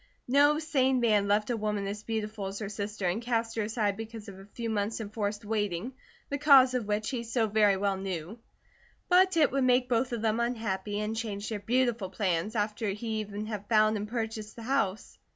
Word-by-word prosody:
No 290 +4 +5
sane 265 -5 +1
man 210 -4 +3
loved 210 +3 +2
a - - +1
woman 210 -2 -2
as 205 +1 -4
beautiful 215 -2 -3
as 195 +1 -5
her 210 -2 -4
sister 205 -1 -4
and 180 +6 0
cast 230 -1 -1
her 225 - 0
aside 210 -2 -1
because 225 -1 -8
of 195 -1 -10
a 195 - -13
few 230 +3 -5
months' 215 0 -1
enforced 210 -1 -3
waiting, 205 +1 -2 0.3
the 285 - -3
cause 270 -3 +7
of 245 -5 -1
which 210 +3 -1
he 250 -3 -2
so 230 0 0
very 210 -2 +3
well 195 0 0
knew; 190 +2 -5 0.7
but 370 0 +5
it 305 -3 +4
would 275 -1 +1
make 250 0 +3
both 245 +1 +1
of 235 -2 -3
them 220 0 +1
unhappy 210 -4 -2
and 215 +1 -2
change 215 -2 -4
their 215 -2 -3
beautiful 235 -2 0
plans, 190 +1 -1
after 210 0 -1
he 220 +2 -3
even 210 0 -5
had 210 -2 -6
found 215 -1 +4
and 210 0 -3
purchased 220 -2 -4
the 230 - -9
house. 225 -6 -1
215 Hz, 205 wpm, -29 LUFS, 205-235 Hz, 0.7 s, cause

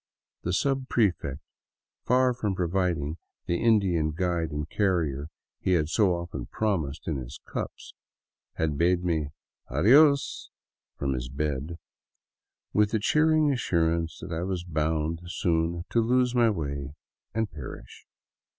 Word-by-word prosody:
The - - -3
subprefect, 105 - 0 0.6
far 125 0 +4
from 105 -5 -2
providing 85 -4 0 0.3
the 85 0 0
Indian 95 -9 +3
guide 85 -1 0
and 75 0 -4
carrier 80 -7 0 0.3
he 95 - +1
had 80 -3 +2
so 95 -1 +3
often 85 -7 -5
promised 85 -10 -2
in 80 -4 0
his 65 0 -7
cups, - - -6 0.6
had 75 -3 -1
bade 90 +1 +3
me 80 -4 0 0.2
" - - -54
adios 140 - +4 0.2
" - - -67
from 70 -1 -1
his - - -4
bed, 75 +3 -3 1.0
with 105 0 +4
the 110 0 0
cheering 155 +5 +3
assurance 85 -8 0
that 85 +1 -6
I 80 - -2
was 90 -1 -2
bound 80 -1 -1
soon 85 0 0
to 115 - +3
lose 125 +2 +2
my 120 -2 +4
way 70 -6 -3 0.4
and 110 -1 0
perish. 65 -4 -10
85 Hz, 135 wpm, -27 LUFS, 75-105 Hz, 1.0 s, far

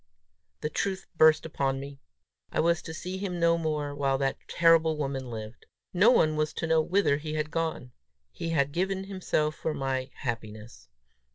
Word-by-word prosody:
The 150 - -1
truth 195 +2 -2
burst 155 0 +5
upon 135 -4 -1
me: 140 0 -8 0.5
I - - -1
was 170 0 +2
to - - -8
see 180 +4 -5
him 185 -3 -3
no 170 0 +4
more 150 -3 -2
while 140 -1 +1
that 135 0 -1
terrible 165 -2 +4
woman 135 -3 -3
lived! 110 0 -8 0.3
No 190 +6 +6
one 155 -10 +4
was 155 0 0
to - - -3
know 160 0 +3
whither 175 -3 +2
he 155 +1 -5
had 155 0 -2
gone! 160 -7 -2 0.4
He 165 - -5
had 140 -4 +1
given 190 +4 -1
himself 185 -6 -1
for 155 0 -3
my 135 -1 -2
happiness! 110 - -6
155 Hz, 175 wpm, -28 LUFS, 135-170 Hz, 0.5 s, No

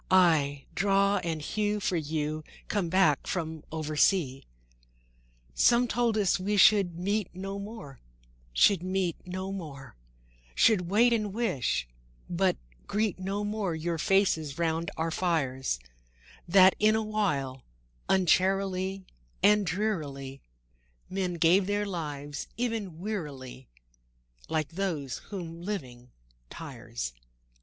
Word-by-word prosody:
—aye, 155 -7 +4
draw 200 +1 +3
and 165 -4 -3
hew 210 +4 -1
for 190 - 0
you, 155 -1 -2 0.3
Come 195 -5 0
back 165 -6 +3
from 160 -3 -3
oversea." 155 -1 +1
III - - -20 1.1
Some 240 - +4
told 230 -1 +1
us 195 -3 +2
we 205 +3 0
should 195 -4 +5
meet 200 +2 -1
no 195 +2 -5
more, 200 - -9 0.5
Should 175 - +4
meet 185 -2 -1
no 185 +1 -4
more; 145 -9 -8 0.6
Should 180 -6 +4
wait, 235 +5 +4
and 215 -3 0
wish, 185 - 0 0.4
but 185 +1 +1 0.3
greet 210 -2 0
no 195 +2 -2
more 205 -4 -2
Your 165 +1 -2
faces 160 -6 +2
round 165 0 0
our 165 +1 -1
fires; 135 - 0 0.7
That, 185 +1 +7
in 215 +1 +4
a 220 - +1
while, 145 -12 -1 0.5
uncharily 190 +1 +2 0.4
And 205 -1 +5
drearily 150 - -3 0.7
Men 185 -2 -1
gave 175 +3 +4
their 205 0 0
lives—even 175 - -4
wearily, 140 - -6 0.8
Like 155 -2 0
those 165 -7 -3
whom 170 -4 -6
living 130 -11 -6 0.4
tires. - - -6
180 Hz, 115 wpm, -29 LUFS, 155-200 Hz, 1.1 s, That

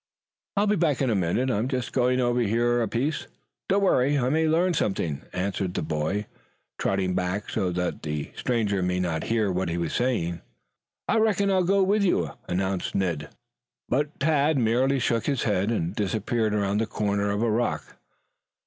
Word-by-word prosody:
"I'll 205 - +4
be 210 0 +2
back 160 -7 +1
in 130 - +1
a - - +2
minute. 100 +8 +1
I'm 110 +2 0
just 130 -2 -3
going 125 0 +2
over 120 -1 +2
here 120 +2 +2
a 115 - +1
piece. 140 +8 -2 0.4
Don't 200 +1 +3
worry. 145 -6 +3
I 125 -2 +1
may 160 +3 +2
learn 175 +3 +2
something," 85 - -1
answered 95 0 -2
the - - -1
boy, 80 +7 -1 0.5
trotting 95 -2 0
back 90 +3 -2
so 95 -5 0
that 90 0 -2
the 75 -2 -4
stranger 105 -6 0
might 90 0 0
not 80 -3 -2
hear 110 -4 +1
what 90 -1 -1
he 85 - -2
was 85 -3 -2
saying. 85 -10 0 0.7
"I - - +2
reckon 200 -2 +2
I'll 185 -1 +3
go 195 +2 +3
with 200 +2 +2
you," 85 - +1 0.2
announced 95 +1 -1
Ned. 85 -6 -1 0.6
But 145 +4 -1
Tad 150 0 +2
merely 125 +3 +2
shook 115 -2 0
his 140 -4 0
head, 100 -1 +1
and 90 -5 -1
disappeared 110 +2 0
around 100 0 +1
the 115 - -1
corner 100 -1 -1
of 100 +2 0
a 115 - +2
rock. 120 +2 -2
115 Hz, 185 wpm, -26 LUFS, 95-135 Hz, 0.7 s, I'll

